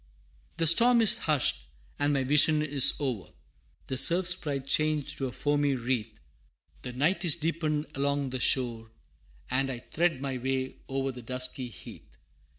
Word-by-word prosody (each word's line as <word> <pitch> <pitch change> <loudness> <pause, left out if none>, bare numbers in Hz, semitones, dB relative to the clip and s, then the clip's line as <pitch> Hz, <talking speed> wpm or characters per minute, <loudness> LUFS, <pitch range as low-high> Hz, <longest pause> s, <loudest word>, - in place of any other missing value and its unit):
VI. - - -33
The 165 - +2
storm 235 +9 +5
is 215 - +5
hushed, 130 - 0 0.3
and 145 0 +1
my 140 -2 0
vision 150 +3 +3
is 145 -3 +3
o'er, 120 - -4 0.6
The 130 - -4
Surf 175 +6 +6
Sprite 150 -7 -1
changed 155 +1 -1
to 135 - -2
a - - -6
foamy 145 0 0
wreath, 120 -3 -3 0.6
The 125 - -7
night 165 +9 0
is 170 -4 +4
deepened 155 -2 -2
along 140 -1 -2
the 130 - -3
shore, 115 -3 0 0.6
And 135 +1 0
I 125 - -5
thread 165 +4 -1
my 135 -2 -4
way 130 +1 -3
o'er 135 0 -2
the 125 -1 -10
dusky 125 +1 -3
heath. 110 - -13
135 Hz, 160 wpm, -28 LUFS, 125-155 Hz, 0.6 s, Surf